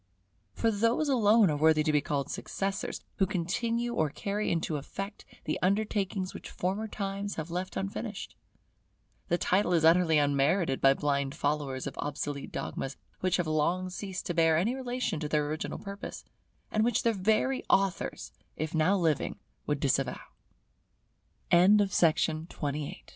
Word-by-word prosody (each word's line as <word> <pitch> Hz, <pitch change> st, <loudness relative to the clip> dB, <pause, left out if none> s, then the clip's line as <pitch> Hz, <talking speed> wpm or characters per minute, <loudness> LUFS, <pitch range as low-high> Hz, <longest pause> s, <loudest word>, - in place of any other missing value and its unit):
For 225 Hz, -, +2 dB
those 230 Hz, +8 st, +1 dB
alone 220 Hz, -, +5 dB
are -, -, 0 dB
worthy 155 Hz, 0 st, +4 dB
to 155 Hz, -, +2 dB
be 150 Hz, -1 st, +3 dB
called 140 Hz, -1 st, -2 dB
successors, 195 Hz, +1 st, -3 dB, 0.2 s
who 195 Hz, -, +3 dB
continue 230 Hz, +6 st, -1 dB
or 155 Hz, -9 st, +1 dB
carry 205 Hz, +8 st, -2 dB
into 165 Hz, -2 st, -1 dB
effect 195 Hz, +8 st, -7 dB, 0.2 s
the -, -, -2 dB
undertakings 195 Hz, -1 st, 0 dB
which -, -, -8 dB
former 195 Hz, +5 st, -2 dB
times 200 Hz, -1 st, -4 dB
have 160 Hz, +1 st, -5 dB
left 180 Hz, +2 st, -3 dB
unfinished; 195 Hz, +1 st, -5 dB, 0.9 s
the 175 Hz, -, +2 dB
title 180 Hz, 0 st, +2 dB
is 165 Hz, -2 st, +3 dB
utterly 165 Hz, -1 st, +5 dB
unmerited 145 Hz, +2 st, +2 dB
by 135 Hz, 0 st, +6 dB
blind 140 Hz, -1 st, -1 dB
followers 145 Hz, -3 st, -1 dB
of 140 Hz, -, -6 dB
obsolete 145 Hz, -1 st, -4 dB
dogmas, 135 Hz, 0 st, -4 dB, 0.2 s
which 185 Hz, -1 st, +1 dB
have 175 Hz, -, 0 dB
long 170 Hz, +4 st, 0 dB
ceased 190 Hz, -1 st, -5 dB
to 175 Hz, -, -2 dB
bear 165 Hz, -1 st, +4 dB
any 205 Hz, +9 st, +1 dB
relation 250 Hz, -, -2 dB
to 150 Hz, -1 st, -3 dB
their 150 Hz, -1 st, +1 dB
original 155 Hz, +1 st, -3 dB
purpose, 200 Hz, +1 st, -7 dB, 0.5 s
and 215 Hz, -, +2 dB
which 240 Hz, 0 st, +1 dB
their 230 Hz, -, +3 dB
very 220 Hz, +7 st, +1 dB
aut 195 Hz, -2 st, +3 dB
185 Hz, 130 wpm, -29 LUFS, 155-205 Hz, 0.9 s, by